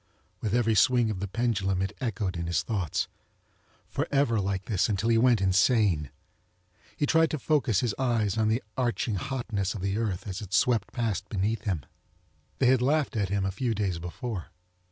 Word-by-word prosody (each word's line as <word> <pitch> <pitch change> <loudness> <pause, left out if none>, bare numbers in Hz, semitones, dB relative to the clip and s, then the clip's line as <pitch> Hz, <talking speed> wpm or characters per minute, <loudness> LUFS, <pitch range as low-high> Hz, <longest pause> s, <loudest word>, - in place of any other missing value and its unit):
With 110 0 0
every 115 -2 +3
swing 120 +2 +4
of 100 - -4
the 100 - -3
pendulum 100 -3 0
it 95 - -4
echoed 105 -6 -2
in 85 0 -3
his 85 - 0
thoughts. 95 - -1 0.8
For - - -2
ever 135 -6 +2
like 95 0 -2
this 100 -1 +1
until 105 +2 0
he 115 - +4
went 120 -3 +4
insane. 95 - +3 0.9
He 145 - +1
tried 160 +2 +4
to 155 - -2
focus 140 - +1
his 120 -4 0
eyes 115 -6 +1
on 110 -1 +2
the 110 +4 +1
arching 120 -2 0
hotness 110 -3 -2
of 100 - -5
the 100 +2 -1
earth 105 -6 -2
as 95 +2 -4
it 100 -3 -8
swept 115 +2 +2
past 110 -6 -2
beneath 105 +1 -1
him. 90 - -1 0.7
They - - +2
had 130 0 +4
laughed 145 +1 +1
at 100 -4 0
him 100 -1 0
a 95 - 0
few 115 +3 -1
days 95 -4 -1
before. 90 +2 -5
110 Hz, 190 wpm, -28 LUFS, 95-120 Hz, 0.9 s, swing